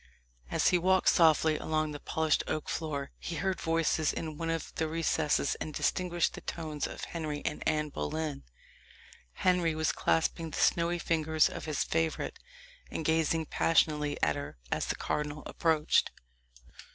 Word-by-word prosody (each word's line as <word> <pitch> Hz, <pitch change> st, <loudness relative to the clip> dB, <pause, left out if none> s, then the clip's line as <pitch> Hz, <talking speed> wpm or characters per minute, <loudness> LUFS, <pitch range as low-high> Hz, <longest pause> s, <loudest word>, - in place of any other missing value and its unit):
As -, -, +3 dB
he 180 Hz, -, +3 dB
walked 190 Hz, +2 st, +4 dB
softly 160 Hz, -1 st, +4 dB
along 155 Hz, -1 st, -1 dB
the 145 Hz, -, -6 dB
polished 160 Hz, 0 st, +1 dB
oak 155 Hz, -, -2 dB
floor, 145 Hz, -4 st, -3 dB
he 170 Hz, -, -5 dB
heard 190 Hz, +3 st, -1 dB
voices 165 Hz, -1 st, +1 dB
in 155 Hz, -2 st, -5 dB
one 165 Hz, +1 st, -3 dB
of 165 Hz, -1 st, -3 dB
the 160 Hz, -, -1 dB
recesses, 160 Hz, -1 st, +1 dB
and 155 Hz, -, -4 dB
distinguished 175 Hz, -2 st, 0 dB
the -, -, -8 dB
tones 155 Hz, -3 st, -4 dB
of -, -, -8 dB
Henry 155 Hz, -3 st, -4 dB
and 150 Hz, -, -2 dB
Anne 150 Hz, -1 st, 0 dB
Boleyn. 145 Hz, -, -3 dB, 0.9 s
Henry 180 Hz, -, +2 dB
was 160 Hz, 0 st, +1 dB
clasping 165 Hz, 0 st, 0 dB
the -, -, -6 dB
snowy 170 Hz, +1 st, +2 dB
fingers 160 Hz, -2 st, +2 dB
of -, -, -7 dB
his 155 Hz, -2 st, 0 dB
favourite, 160 Hz, -1 st, -1 dB, 0.5 s
and 160 Hz, -, -4 dB
gazing 160 Hz, 0 st, +2 dB
passionately 150 Hz, -2 st, +2 dB
at 75 Hz, -, +3 dB
her, 70 Hz, 0 st, -6 dB
as -, -, 0 dB
the -, -, -1 dB
cardinal 150 Hz, 0 st, -3 dB
approached. 160 Hz, -2 st, +2 dB
160 Hz, 155 wpm, -31 LUFS, 150-165 Hz, 0.9 s, walked